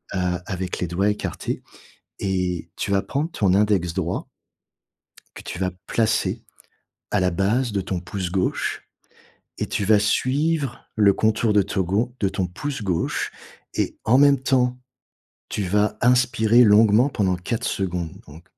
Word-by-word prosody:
heu, - - 0 0.3
avec 95 -2 -4
les 90 - -1
doigts 95 +5 +1
écartés 105 - -3 0.6
et 90 -3 -2
tu - - -3
vas 100 0 +2
prendre 145 +4 -2
ton 95 - +1
index 100 -4 +2
droit - - -3 1.1
que - - -8
tu - - -7
vas 90 0 -1 0.2
placer 110 -1 0 0.7
à 105 - +2
la 90 -1 +2
base 105 +8 0
de 100 -2 -1
ton 95 -1 -3
pouce 90 0 -5
gauche 90 0 -1 0.8
et - - -1
tu 100 - -2
vas 105 +1 +5
suivre 135 +5 0
le 105 -2 +5
contour 110 +1 +1
de 105 - +5
to 95 0 -1
gau 110 +8 -1
de 100 - +1
ton 95 -1 -2
pouce 135 +9 -5
gauche 90 -5 -1 0.4
et - - -1
en 120 +4 +4
même 140 -1 +5
temps, 125 -1 +1 0.7
tu 105 - -2
vas 105 +3 +1
inspirer 120 -1 +4
longuement 110 +4 +5
pendant 95 -8 0
4 115 +7 -3
secondes 90 -6 -2 0.2
donc 75 +3 -14
105 Hz, 155 wpm, -23 LUFS, 95-120 Hz, 1.1 s, vas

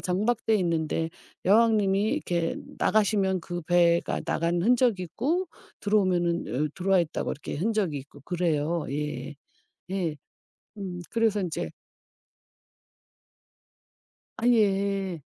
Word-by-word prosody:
정박돼 215 +4 +1
있는데 165 -2 0 0.3
여왕님이 205 -1 +4
이렇게 175 - -1 0.2
나가시면 200 -3 +2
그 175 0 -5
배가 170 0 +3
나간 170 +1 0
흔적이 235 -4 +3
있고 325 - -1 0.3
들어오면은 175 -8 +1
어 - - -4
들어와 190 0 +3
있다고 165 -1 -2
이렇게 150 - -6
흔적이 195 -5 0
있고 145 +1 -13
그래요. 165 -1 0
예. 145 -1 -4 0.6
예. 175 -6 -1 0.6
음 185 -3 -5
그래서 225 -3 +2
인제 175 -4 -3 2.7
아예. 195 -6 +1
185 Hz, 235 characters per minute, -27 LUFS, 170-210 Hz, 2.7 s, 여왕님이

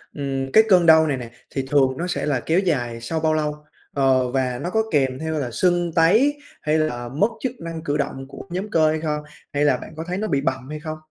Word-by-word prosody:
ừm, 135 -2 -3
cái 220 - +7
cơn 180 -3 +6
đau 160 -1 +7
này 140 - 0
nè, 120 -2 -8 0.2
thì 135 - -3
thường 135 -2 +3
nó 175 +4 -2
sẽ 180 - -2
là 145 -4 +1
kéo 165 +7 +1
dài 120 -11 -1
sau 160 +7 -2
bao 160 0 +1
lâu? 150 -1 -2 0.3
Ờ, 130 -2 +2
và 125 -2 -1
nó 175 - -3
có 220 +4 +1
kèm 135 -4 +1
theo 160 -1 -2
là 125 -3 -3
sưng 175 +4 +1
tấy 225 - +4 0.2
hay 155 +1 +1
là 120 -6 -2
mất 150 - +2
chức 260 - -1
năng 165 -1 -6
cử 145 -2 -1
động 135 -2 -3
của - - -10
nhóm 185 +4 -4
cơ 160 -5 +3
hay 155 0 -1
không? 150 -2 -2 0.3
Hay 145 +1 +2
là 135 -4 +3
bạn - - -10
có 160 - -4
thấy 180 +1 -2
nó 215 +2 -2
bị 140 -8 +1
bầm 130 -1 -2
hay 155 0 -5
không? 155 0 -6
150 Hz, 255 wpm, -22 LUFS, 135-165 Hz, 0.3 s, cái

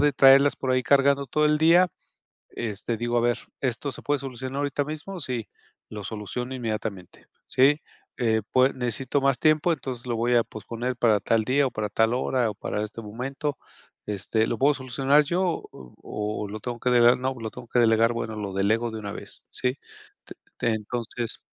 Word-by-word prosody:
de 145 0 +4
traerlas 140 +1 +6
por 130 - -2
ahí 130 0 +2
cargando 140 +1 +3
todo 150 +4 +2
el 150 - +3
día, 170 +3 +5 0.6
este, 115 +1 -4
digo: 120 +1 -2
"A - - +3
ver, 120 0 +2 0.2
¿esto 130 +2 -2
se - - -7
puede 145 0 0
solucionar 130 0 -6
ahorita 145 0 0
mismo? 155 +5 -6
Sí, 125 -7 -3 0.4
lo 105 -1 -7
soluciono 115 +5 -4
inmediatamente, 110 -6 -5 0.2
¿sí? 140 +3 +4 0.4
Eh, 110 -3 +2
pued 130 +1 +4
necesito 130 +3 -1
más 135 -2 +3
tiempo, 155 +2 +3
entonces 130 -5 -6
lo 120 - -1
voy 120 +2 +1
a 115 - +5
posponer 115 +4 -5
para 115 -3 +3
tal 110 +2 +1
día, 135 +4 +2
o - - -6
para 105 -1 -3
tal 110 +2 +2
hora, 125 -2 +1
o 105 - -6
para 105 +1 -3
este 110 +2 -7
momento. 135 +7 -4 0.5
Este, 105 +2 0
¿lo 115 - -2
puedo 145 +2 +4
solucionar 135 +2 +2
yo, 175 +3 -1
o-o 105 - -6
lo 105 +2 -6
tengo 120 +2 -5
que 125 - 0
delegar? 120 0 +6
No, 130 +1 -1
lo 115 -3 -6
tengo 125 +2 -11
que 120 - +1
delegar, 115 0 +4
bueno, 115 -1 -4
lo 100 -2 -5
delego 110 +5 +1
de 110 - -5
una 100 -1 -5
vez, - - -8
¿sí?". 125 0 0 0.5
T - - -10 0.2
te 120 - +1
entonces 115 +1 -4
120 Hz, 190 wpm, -25 LUFS, 110-135 Hz, 0.6 s, traerlas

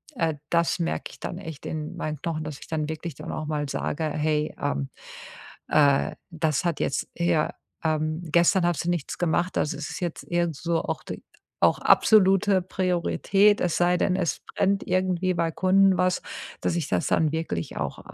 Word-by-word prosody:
äh, 165 -7 0
das 170 0 +2
merke 80 -1 -2
ich - - -16
dann - - -4
echt 160 -3 -8
in 155 +2 -4
meinen 155 -3 -3
Knochen, 160 -2 -2
dass 150 -2 -6
ich - - -12
dann 155 -1 -2
wirklich 160 -1 -5
dann - - -7
auch 155 - -4
mal 150 -2 -2
sage: 155 +3 -2
„Hey, 150 0 0
ähm, 70 0 -1 0.8
äh, 140 -2 +3 0.2
das 160 -1 0
hat 170 -4 0
jetzt - - -1
hier, 170 -3 +1 0.3
ähm 155 0 0
gestern 170 +3 +3
hast 175 -4 0
du - - 0
nichts 175 -5 -2
gemacht, 175 +1 0
also 150 - 0
es 150 -1 -5
ist - - -6
jetzt 175 -3 -3
irgend 175 -2 -1
so 165 +1 0
auch - - -3
d - - -6 0.4
auch - - +5
absolute 195 -2 +5
Priorität, 190 +3 +2
es 175 -3 +1
sei 175 0 +3
denn, 185 +1 +1
es 175 -6 -1
brennt 195 0 +2
irgendwie 185 0 +1
bei 165 -1 0
Kunden 190 +2 +4
was, 185 0 +1 0.4
dass - - 0
ich 170 -4 -1
das 90 - +1
dann 155 -2 +2
wirklich 160 - -3
auch, - - -3
165 Hz, 185 wpm, -26 LUFS, 155-180 Hz, 0.8 s, auch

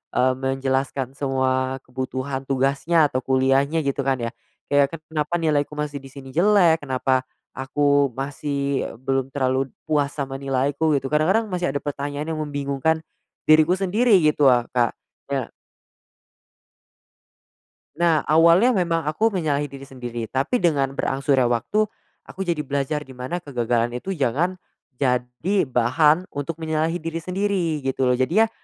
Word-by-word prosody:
eee, 130 +1 +3
menjelaskan 135 0 -1
semua 130 -1 0
kebutuhan 130 +1 -4
tugasnya 140 +4 +2
atau 130 - 0
kuliahnya 135 +4 +2
gitu 140 0 0
kan 135 -1 +2
ya. 115 0 -3 0.4
Kayak, 145 +2 +3 0.2
"Kenapa 150 +2 -1
nilaiku 150 -2 +1
masih 145 -1 -3
di 135 - -11
sini 135 -1 -11
jelek? 175 -3 +4
Kenapa 130 -1 +1 0.3
aku 140 +1 +2
masih 140 0 -2 0.2
belum 135 0 0
terlalu 130 -1 0 0.2
puas 145 -2 +1
sama 135 -2 -4
nilaiku?" 140 +3 0
Gitu. 135 - -3
Kadang-kadang 190 +9 +2
masih 180 -1 -1
ada 140 - -2
pertanyaan 145 +2 -4
yang 155 - -3
membingungkan 145 +2 -1 0.5
diriku 155 +3 +6
sendiri 205 +3 +3
gitu 150 -2 +4
ah, 120 -1 +4
Kak. 120 -2 +1 0.3
Ya. 135 -4 -2 2.5
Nah, 170 -3 +2
awalnya 170 +10 +5
memang 170 -5 0
aku 215 +10 +1
menyalahi 150 -7 -1
diri 135 0 -10
sendiri, 120 -3 -6
tapi 135 - 0
dengan 140 - +1
berangsurnya 135 -1 +1
waktu, 120 - +1 0.4
aku 195 - -9
jadi 170 -5 -1
belajar 140 +2 -2
di 135 - -12
mana 130 +7 -4
kegagalan 120 -6 -1
itu 125 +10 -6
jangan 155 +8 0 0.4
jadi 125 +7 0
bahan 150 +8 +3
untuk 145 +3 -4
menyalahi 160 +1 -1
diri 165 0 -5
sendiri 180 -5 -1
gitu 130 -1 +1
loh. 125 - +2
Jadinya, 195 +13 +3
140 Hz, 140 wpm, -23 LUFS, 130-160 Hz, 2.5 s, diriku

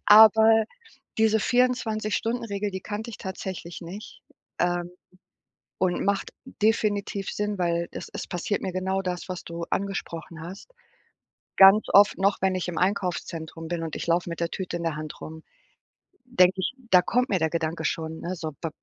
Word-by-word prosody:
Aber 220 +1 +8 0.5
diese 220 -1 +4
24- 235 -4 +1
Stunden-Regel, 225 -3 -2
die 190 -1 -5
kannte 220 +2 -5
ich 220 - -8
tatsächlich 185 -3 -6
nicht, 185 +6 -9 0.4
ähm, 175 0 0 0.9
und 180 -2 0
macht 200 0 0
definitiv 210 -4 0
Sinn, 210 0 -2
weil, 170 -1 0
es - - -7
es - - -5
passiert 180 +3 -2
mir 190 - -3
genau 190 +1 -1
das, 180 -1 -4
was 180 -1 -5
du 170 0 -6
angesprochen 170 -4 -4
hast. 190 - -10 0.9
Ganz 195 +3 +8
oft 205 +1 +6
noch, 195 +1 +3
wenn 190 0 +2
ich 185 -1 -2
im 175 - -4
Einkaufszentrum 170 -4 -2
bin 170 0 -3
und 160 - -5
ich - - -4
laufe 170 +1 +1
mit 170 - -5
der 170 0 0
Tüte 180 -2 -4
in 170 - -6
der 165 -2 -1
Hand 155 0 -7
rum, 160 0 -8 0.8
denke 185 -8 +4
ich 185 - -1 0.2
da 180 - +8
kommt 250 +7 +1
mir 190 - +1
der 160 0 +1
Gedanke 160 0 -2
schon, 160 0 -2
ne: 180 +2 -3
„So, 160 -3 -5
b 165 - -2
185 Hz, 170 wpm, -26 LUFS, 170-210 Hz, 0.9 s, Aber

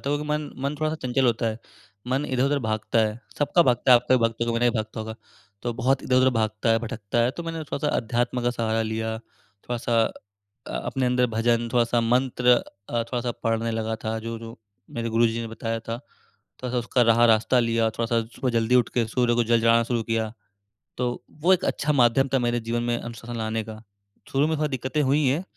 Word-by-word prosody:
क्योंकि 145 +1 -1
मन 150 0 -2
मन 140 - -1
थोड़ा-सा 155 0 0
चंचल 125 +1 +1
होता 115 0 +1
है। 110 0 -2 0.5
मन 135 +3 0
इधर-उधर 135 +3 +1
भागता 110 -2 -1
है, 110 +1 +1 0.2
सबका 160 +4 +4
भागता 125 -2 +2
है, - - +10
आपका 125 +2 +2
भी 125 - 0
भागता 115 0 +1
होगा, 115 - 0
मेरा 120 0 +3
भी 115 - -3
भागता 110 0 -4
होगा 110 0 -5 0.5
तो 120 - -1
बहुत 130 +3 +1
इधर-उधर 130 0 +3
भागता 110 -1 0
है, 115 - +4
भटकता 115 -1 -4
है। 120 - +2
तो 170 - -7
मैंने 165 0 -4
थोड़ा-सा 145 0 -2
अध्यात्म 120 +1 -1
का 120 - +2
सहारा 115 -2 -1
लिया, 110 0 -2
थोड़ा-सा 115 +2 -3 0.6
अ, - - -7
अपने 130 -1 -1
अंदर 125 0 +2
भजन, 115 +1 +1
थोड़ा-सा 120 -1 +2
मंत्र, 125 +1 +2 0.4
अ, 120 -1 0
थोड़ा-सा 125 -1 -1
पढ़ने 115 0 0
लगा 110 0 -2
था, 110 0 -1
जो, 115 +1 -5
जो 115 +1 -10 0.4
मेरे 115 0 -2
गुरुजी 115 0 +2
ने 115 - -4
बताया 115 0 -3
था। 115 +1 -5
थोड़ा-सा 125 -2 -8
उसका 120 +1 +1
राह 115 0 +5
रास्ता 115 +3 +3
लिया, 115 -1 +1
थोड़ा-सा 115 +1 0 0.2
सुबह 130 - -1
जल्दी 115 +2 +2
उठ 125 -2 +4
के 120 -3 +2
सूर्य 120 0 +1
को 120 - +2
जल 115 0 +3
चढ़ाना 115 0 +5
शुरू 120 -1 -1
किया, 110 -1 -1 0.7
तो 125 -1 -2 0.2
वो 180 +4 +5
एक 185 - 0
अच्छा 150 - 0
माध्यम 125 +1 +4
था 135 - +4
मेरे 120 0 0
जीवन 120 0 0
में 120 0 0
अनुशासन 120 0 -7
लाने 110 0 -2
का। 110 0 -9 0.5
शुरू 140 +2 +2
में 160 -1 0
थोड़ी 150 0 0
दिक्कतें 130 +3 -1
हुई 145 +2 +2
है, 145 +8 +1
120 Hz, 210 wpm, -25 LUFS, 115-130 Hz, 0.7 s, है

